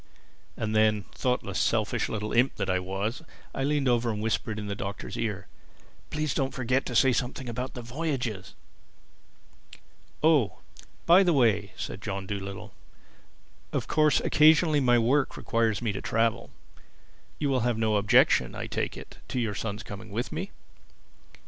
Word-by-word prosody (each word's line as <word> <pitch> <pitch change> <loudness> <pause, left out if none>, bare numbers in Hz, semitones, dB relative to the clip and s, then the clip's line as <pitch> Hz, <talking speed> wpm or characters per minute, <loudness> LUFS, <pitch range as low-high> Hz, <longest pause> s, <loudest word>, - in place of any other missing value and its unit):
And 110 0 -2
then, 110 -2 +3
thoughtless, 125 -1 -1
selfish - - 0
little 105 0 -3
imp 125 +3 +3
that 95 - -1
I 90 - +1
was, 95 - -3 0.3
I 135 - -2
leaned 145 -1 +1
over 120 -1 +2
and 105 -2 -2
whispered 110 0 -2
in 105 - -4
the 100 - -3
Doctor's 100 0 -6
ear, 105 -5 -3 0.6
"Please 150 -2 -1
don't 135 -1 -1
forget 130 +1 0
to 125 - -4
say 130 +1 +5
something 125 +1 -3
about 125 +2 -4
the 120 - -6
voyages." 125 - -4 1.7
"Oh, 145 - +3 0.5
by 175 +3 +7
the 180 -3 +3
way," 110 -7 +2
said 95 - -5
John 100 -2 -4
Dolittle, 100 0 -6 1.0
"of - - -1
course 155 -3 +3
occasionally 155 0 +5
my 120 -3 +4
work 130 +5 +1
requires 115 -1 0
me 110 - 0
to 100 - -5
travel. 115 0 0 0.9
You 145 - -1
will 130 - +2
have 120 -1 0
no 110 -1 +2
objection, 100 0 +4
I - - -4
take - - -3
it, - - -12
to 125 - -2
your 110 -4 -1
son's 105 +1 -4
coming 105 +2 -9
with 115 +5 -3
me?" 175 +5 -4
115 Hz, 160 wpm, -27 LUFS, 105-135 Hz, 1.7 s, by